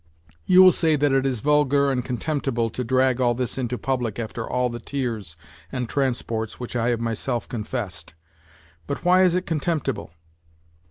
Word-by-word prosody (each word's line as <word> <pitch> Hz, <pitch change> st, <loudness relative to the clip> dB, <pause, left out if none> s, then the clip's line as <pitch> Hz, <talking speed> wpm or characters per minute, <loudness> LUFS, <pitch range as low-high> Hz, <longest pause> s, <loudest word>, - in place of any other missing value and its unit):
You 185 Hz, 0 st, +7 dB
will 185 Hz, -, +9 dB
say 160 Hz, -1 st, +2 dB
that 145 Hz, -1 st, +2 dB
it 135 Hz, 0 st, +2 dB
is 125 Hz, -5 st, -2 dB
vulgar 145 Hz, -1 st, +3 dB
and 125 Hz, -2 st, -1 dB
con 125 Hz, -1 st, -3 dB
temptible 135 Hz, -7 st, -1 dB
to 125 Hz, -, -3 dB
drag 130 Hz, +1 st, +2 dB
all 120 Hz, -1 st, +3 dB
this 125 Hz, +1 st, -3 dB
into 125 Hz, -1 st, -2 dB
public 125 Hz, -5 st, -2 dB
after 115 Hz, 0 st, -5 dB
all 125 Hz, 0 st, +1 dB
the 120 Hz, -1 st, -5 dB
tears 115 Hz, -, -4 dB, 0.3 s
and 125 Hz, -2 st, -3 dB
transports 115 Hz, -5 st, -2 dB
which 125 Hz, 0 st, -6 dB
I 120 Hz, 0 st, +1 dB
have 120 Hz, -2 st, 0 dB
myself 115 Hz, +1 st, -2 dB
confessed. 105 Hz, -, -5 dB, 0.7 s
But 140 Hz, -, -4 dB
why 180 Hz, +1 st, +5 dB
is 180 Hz, -2 st, +4 dB
it 185 Hz, -, -1 dB
con 160 Hz, -2 st, -1 dB
temptible 165 Hz, -1 st, -2 dB
125 Hz, 180 wpm, -24 LUFS, 115-140 Hz, 0.7 s, will